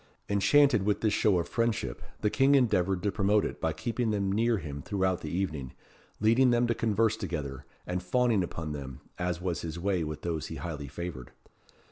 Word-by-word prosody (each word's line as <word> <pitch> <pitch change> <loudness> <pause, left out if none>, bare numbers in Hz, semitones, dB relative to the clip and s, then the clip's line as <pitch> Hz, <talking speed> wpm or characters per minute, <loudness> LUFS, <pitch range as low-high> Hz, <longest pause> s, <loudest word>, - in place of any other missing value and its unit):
Enchanted 120 +4 +4
with 100 +1 0
this 110 -2 +2
show 105 -4 +3
of 85 -1 -1
friendship, 115 - -1 0.2
the 105 - +1
King 140 +1 +4
endeavoured 95 -8 +2
to 100 - +1
promote 100 +2 +2
it - - -5
by 80 - +1
keeping 115 +9 -2
them 100 -2 0
near 115 +3 +2
him 70 -5 -6
throughout 95 -1 0
the 75 - -5
evening, 75 -7 -3 0.5
leading 115 +5 +4
them 120 0 +3
to 120 - +1
converse 115 -1 +1
together, 75 - -5 0.2
and 90 0 -2
fawning 115 +2 +2
upon 80 -2 -5
them, 70 -3 -7 0.2
as 90 -2 -1
was 90 -2 -2
his 85 0 -5
way 90 -1 0
with 75 -1 -5
those 80 -4 -2
he - - -6
highly 75 -5 -5
favoured. 70 -3 -6
95 Hz, 190 wpm, -29 LUFS, 80-110 Hz, 0.5 s, Enchanted